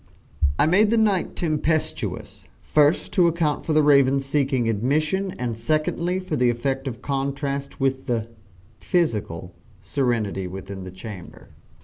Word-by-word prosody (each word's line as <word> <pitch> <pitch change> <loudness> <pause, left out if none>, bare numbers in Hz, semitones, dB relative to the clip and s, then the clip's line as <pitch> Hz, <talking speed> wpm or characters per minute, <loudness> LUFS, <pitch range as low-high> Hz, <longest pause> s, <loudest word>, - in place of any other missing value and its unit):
I - - +4
made 195 +7 +4
the 230 - +2
night 205 -5 +1
tempestuous, 155 -1 -2
first 150 +1 +2
to 180 -4 +5
account 165 -3 0
for 160 - +1
the 155 0 +4
Raven's 140 -1 +4
seeking 135 -4 +1
admission, 155 - 0
and 120 -2 -2
secondly, 155 +8 0
for 185 -4 -3
the 125 -3 +3
effect 135 +3 -2
of 115 -3 -6
contrast 140 0 -3
with 135 -1 0
the 115 -3 -1 0.5
(physical) 105 - -1 0.3
serenity 105 -3 -1
within 95 +1 -7
the 95 - -7
chamber. 95 -1 -10
140 Hz, 135 wpm, -23 LUFS, 115-155 Hz, 0.5 s, to